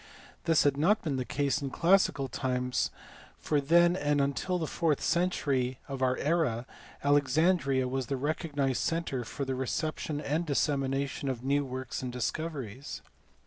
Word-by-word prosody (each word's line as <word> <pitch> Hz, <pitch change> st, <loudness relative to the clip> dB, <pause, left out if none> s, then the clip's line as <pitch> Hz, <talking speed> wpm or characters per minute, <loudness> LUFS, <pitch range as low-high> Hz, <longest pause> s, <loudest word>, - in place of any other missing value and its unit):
This 165 Hz, -2 st, +4 dB
had 140 Hz, -1 st, +2 dB
not 190 Hz, +9 st, +3 dB
been 145 Hz, -5 st, -1 dB
the 130 Hz, -, -2 dB
case 140 Hz, +4 st, 0 dB
in 140 Hz, -, -3 dB
classical 170 Hz, -3 st, +3 dB
times 125 Hz, 0 st, -1 dB, 0.5 s
for 150 Hz, -2 st, 0 dB
then 170 Hz, +4 st, +5 dB
and 145 Hz, -4 st, +1 dB
until 140 Hz, +6 st, 0 dB
the 165 Hz, -, -2 dB
fourth 155 Hz, -1 st, 0 dB
century 140 Hz, -8 st, 0 dB
of 135 Hz, -1 st, -5 dB
our 130 Hz, 0 st, +2 dB
era 145 Hz, -7 st, 0 dB, 0.4 s
Alexandria 145 Hz, -1 st, +3 dB
was 130 Hz, -1 st, -2 dB
the 135 Hz, -, -1 dB
recognized 140 Hz, -4 st, -1 dB
centre 165 Hz, -6 st, -1 dB
for 135 Hz, +4 st, -4 dB
the 135 Hz, -, -2 dB
reception 145 Hz, +3 st, -2 dB
and 150 Hz, +3 st, -1 dB
dissemination 140 Hz, -2 st, 0 dB
of 125 Hz, -2 st, -4 dB
new 140 Hz, +2 st, +2 dB
works 130 Hz, -1 st, -5 dB
and 125 Hz, -1 st, -4 dB
discoveries. 135 Hz, -1 st, -4 dB
140 Hz, 150 wpm, -30 LUFS, 130-155 Hz, 0.5 s, then